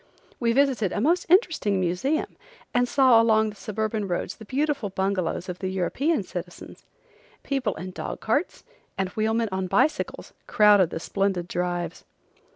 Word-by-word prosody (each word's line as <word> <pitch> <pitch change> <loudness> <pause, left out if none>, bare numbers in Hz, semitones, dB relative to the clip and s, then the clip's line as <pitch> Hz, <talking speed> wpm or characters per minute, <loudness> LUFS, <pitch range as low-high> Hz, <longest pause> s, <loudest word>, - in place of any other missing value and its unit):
We 235 -2 +2
visited 255 -6 +2
a - - -2
most 335 - +1
interesting 320 - +3
museum, 185 - -1 0.4
and 245 0 +2
saw 255 -4 +5
along 220 -1 +3
the - - -15
suburban 215 0 -3
roads 175 -2 -3
the 220 - -11
beautiful 280 -2 -1
bungalows 190 -2 -2
of 180 -1 -6
the 190 - -3
European 210 - 0
citizens. 175 -1 -9 0.6
People 270 -5 -1
in 185 +3 -7
dog - - -6
carts 285 +11 -1 0.3
and 190 -1 -1
wheelmen 220 +2 0
on 190 0 -2
bicycles 200 +12 0
crowded 210 -6 +5
the - - -5
splendid 195 -1 -1
drives. 175 -1 -3
210 Hz, 150 wpm, -25 LUFS, 185-245 Hz, 0.6 s, saw